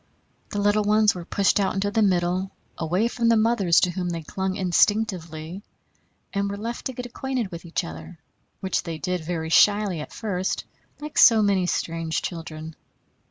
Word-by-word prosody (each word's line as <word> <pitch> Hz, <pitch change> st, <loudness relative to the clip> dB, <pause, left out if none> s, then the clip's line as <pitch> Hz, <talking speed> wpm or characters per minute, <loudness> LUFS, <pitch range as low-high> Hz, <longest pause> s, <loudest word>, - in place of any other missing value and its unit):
The -, -, -5 dB
little 205 Hz, +1 st, +3 dB
ones 210 Hz, 0 st, +4 dB
were 175 Hz, -2 st, -7 dB
pushed 200 Hz, +2 st, +2 dB
out 195 Hz, -, 0 dB
into 200 Hz, +1 st, 0 dB
the 220 Hz, -, +1 dB
middle, 185 Hz, -1 st, +1 dB, 0.3 s
away 180 Hz, +7 st, 0 dB
from 235 Hz, -1 st, 0 dB
the 230 Hz, -, +5 dB
mothers 215 Hz, -6 st, +3 dB
to 180 Hz, -, +2 dB
whom 180 Hz, 0 st, -3 dB
they 165 Hz, -2 st, -4 dB
clung 190 Hz, +4 st, -3 dB
instinctively, 180 Hz, -3 st, 0 dB, 0.7 s
and 200 Hz, 0 st, 0 dB
were 200 Hz, -, -4 dB
left 230 Hz, +3 st, -5 dB
to 260 Hz, -, -6 dB
get 250 Hz, 0 st, -6 dB
acquainted 245 Hz, -3 st, -3 dB
with 170 Hz, 0 st, -8 dB
each 170 Hz, -, -2 dB
other, 80 Hz, 0 st, -9 dB, 0.4 s
which 190 Hz, -, 0 dB
they 165 Hz, -3 st, -5 dB
did 180 Hz, +1 st, -2 dB
very 160 Hz, -1 st, -3 dB
shyly 205 Hz, 0 st, +4 dB
at 150 Hz, -, -7 dB
first, 190 Hz, -4 st, -2 dB, 0.4 s
like 300 Hz, 0 st, -3 dB
so 220 Hz, -2 st, +7 dB
many 195 Hz, -3 st, +2 dB
strange 165 Hz, -2 st, -2 dB
children. 160 Hz, -2 st, -6 dB
190 Hz, 175 wpm, -24 LUFS, 170-210 Hz, 0.7 s, so